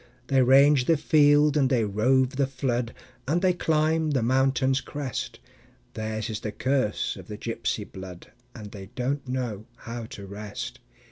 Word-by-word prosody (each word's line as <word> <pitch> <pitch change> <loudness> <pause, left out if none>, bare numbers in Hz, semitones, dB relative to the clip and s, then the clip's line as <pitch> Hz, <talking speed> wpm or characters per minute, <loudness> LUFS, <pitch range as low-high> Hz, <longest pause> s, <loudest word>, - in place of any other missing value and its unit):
They 135 -1 +4
range 135 +1 +5
the 165 +2 +3
field 150 -1 +4
and 135 -3 +3
they 125 -4 +2
rove 130 +6 +2
the 140 -1 +2
flood, 125 -3 -2 0.3
And 170 +6 +1
they 185 -1 +4
climb 160 -1 +1
the 135 -5 +1
mountain's 130 +1 +2
crest; 145 -3 -5 0.5
Theirs 110 0 -3
is 110 -2 -4
the 105 - -4
curse 130 -2 0
of - - -11
the - - -7
gypsy - - -3
blood, 95 -2 -10 0.2
And 105 -4 -9
they 95 -2 -9
don't 135 +2 -2
know 120 -4 -3
how 115 0 -6
to 100 -3 -9
rest. 105 +1 -7
130 Hz, 160 wpm, -26 LUFS, 110-145 Hz, 0.5 s, range